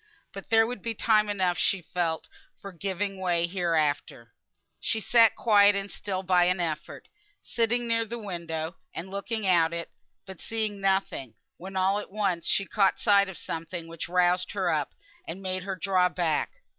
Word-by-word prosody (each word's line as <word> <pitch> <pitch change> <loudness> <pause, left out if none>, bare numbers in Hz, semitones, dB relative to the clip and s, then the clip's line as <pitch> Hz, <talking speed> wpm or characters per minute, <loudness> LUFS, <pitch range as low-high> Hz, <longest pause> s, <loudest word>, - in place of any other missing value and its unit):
But 195 -2 -9
there 225 0 +5
would 235 -3 -5
be 230 +2 -4
time 215 -1 +3
enough 185 -4 0
she 190 -3 +1
felt 165 -1 -2 0.3
for 200 - -8
giving 195 +2 -3
way, 175 -2 +1
hereafter. 155 - -1
So - - -48
she 220 - -1
sat 225 0 +5
quiet 205 -3 +5
and 200 0 -3
still 190 -2 -4
by 180 -1 +4
an 180 +1 +1
effort; 165 -3 -4 0.4
sitting 240 +1 0
near 230 0 +2
the 230 +2 -6
window, 170 -5 -5 0.2
and 185 +3 -6
looking 210 +2 -3
out 170 -3 +3
of 170 - -2
it, 170 - -8 0.3
but 190 -3 -10
seeing 215 -3 -3
nothing, 190 - -1 0.2
when 190 +2 -9
all 190 +2 +2
at - - -8
once 190 -4 -1
she 195 - +2
caught 195 0 +2
sight 200 -2 +4
of 190 - -8
something 165 +1 -5
which 165 0 -7
roused 180 0 +2
her - - 0
up, - - -1 0.3
and 195 - -6
made 185 -1 -3
her 195 -1 -3
draw 185 0 +2
back. 170 -4 0
190 Hz, 180 wpm, -27 LUFS, 175-205 Hz, 0.4 s, there